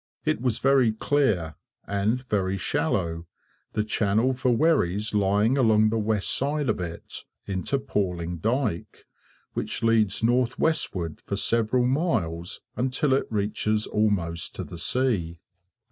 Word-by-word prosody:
It - - 0
was 125 -4 +2
very 135 -5 +3
clear, 110 - +1 0.3
and 105 +5 0
very 95 -3 0
shallow, 85 -1 -1 0.5
the 105 - 0
channel 110 +4 +1
for 125 0 0
wherries 110 - +2
lying 105 +5 +2
along 110 -3 +4
the 115 +1 0
west 105 -2 +2
side 145 0 0
of 110 - 0
it, 85 -2 -6 0.2
into 95 +8 -1
Palling 90 -10 -2
dyke, 115 - -2 0.5
which - - -3
leads 115 -2 +2
north 120 +1 +2
westward 90 - -1
for 100 - -1
several 115 +4 +2
miles 110 - -1
until 130 +3 +1
it 135 - +1
reaches 105 0 0
almost 95 -6 -1
to - - -4
the 85 - -9
sea. 90 -4 0
110 Hz, 130 wpm, -25 LUFS, 95-125 Hz, 0.5 s, along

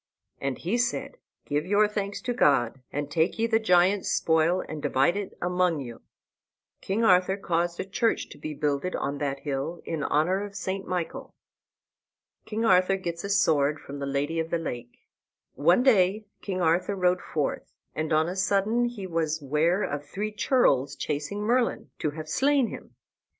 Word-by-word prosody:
And 135 -2 -2
he 205 +8 -1
said, 250 - -2 0.3
"Give 145 +1 -1
your 205 +4 +3
thanks 205 -1 -4
to 245 - -2
God; 135 - +2
and 145 0 -4
take 160 +2 +1
ye 225 - +1
the 225 -1 +2
giant's 185 -1 +3
spoil 165 +3 +2
and 155 -1 -6
divide 140 +7 +2
it 205 -1 -5
among 180 -2 +1
you." 120 -4 -7
And - - -39
King 205 +4 -1
Arthur 185 -1 +4
caused 175 -2 -1
a - - -2
church 225 +4 0
to - - -12
be 155 -1 -5
builded 150 +4 -1
on 140 0 -3
that 140 -1 -2
hill, 145 +4 -3
in 160 -2 -3
honor 180 +8 +1
of 205 -1 -8
St. 190 0 -4
Michael. 180 -3 -4 1.1
KING 225 +1 -2
ARTHUR 185 -1 +4
GETS 170 -1 -5
A - - -4
SWORD 150 -6 +2
FROM 140 0 -8
THE 140 - -3
LADY 145 +4 -1
OF 160 0 -2
THE 170 - +1
LAKE 120 -7 -7 0.5
One 175 +11 +3
day 210 -4 +3 0.2
King 185 -2 -3
Arthur 175 +4 +2
rode 180 -1 +2
forth, 150 -3 -3 0.2
and 155 +1 -3
on 155 +1 +3
a 180 - -3
sudden 200 +5 +1
he 240 -5 -5
was 160 -3 -1
ware 155 +7 +1
of 145 0 -3
three 205 +8 -4
churls 210 - +2
chasing 150 +8 -3
Merlin, 240 +2 0
to 150 - 0
have 155 +1 -7
slain 270 - +2
him. - - -10
175 Hz, 175 wpm, -27 LUFS, 150-200 Hz, 1.1 s, Arthur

